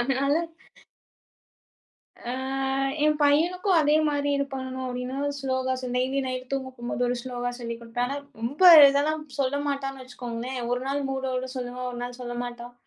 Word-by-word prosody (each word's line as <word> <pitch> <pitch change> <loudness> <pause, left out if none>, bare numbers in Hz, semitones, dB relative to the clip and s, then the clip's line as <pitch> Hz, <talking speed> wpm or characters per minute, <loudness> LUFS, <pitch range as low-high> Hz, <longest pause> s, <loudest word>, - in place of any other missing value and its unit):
அதனால 275 +3 +1 2.0
அ - - -2 0.7
என் 305 0 +3
பையனுக்கும் 350 +6 +3
அதேமாரி 295 -1 +2
இது 280 - +1
பண்ணணும் 260 0 -4
அப்பிடின்னு 260 +3 -3
ஸ்லோஹாஸ் 260 -1 -1
டெய்லி 265 +2 +1
நைட் 255 -1 -4
தூங்க 265 -1 -1
போம்போது, 240 +1 -3
ஒரு 245 - 0
ஸ்லோஹா 245 -1 -3
சொல்லிக் 235 -1 -5
குடுப்பேன். 235 +1 -2
ஆனா 280 +2 -3 0.2
ரொம்ப 245 +9 -4 0.3
இதெல்லாம் 300 +3 +1 0.2
சொல்ல 275 +1 +1
மாட்டான்னு 270 -1 -3
வச்சுக்கோங்களேன்! 250 0 -6
ஒருநாள் 270 +3 -1
மூட் 265 0 -2
ஓட 255 +1 -2
சொல்லுவான், 250 0 -4
ஒரு 240 - -6
நாள் 245 0 -6
சொல்ல 240 -1 -5
மாட்டான். 240 0 -8
260 Hz, 145 wpm, -26 LUFS, 245-280 Hz, 2.0 s, என்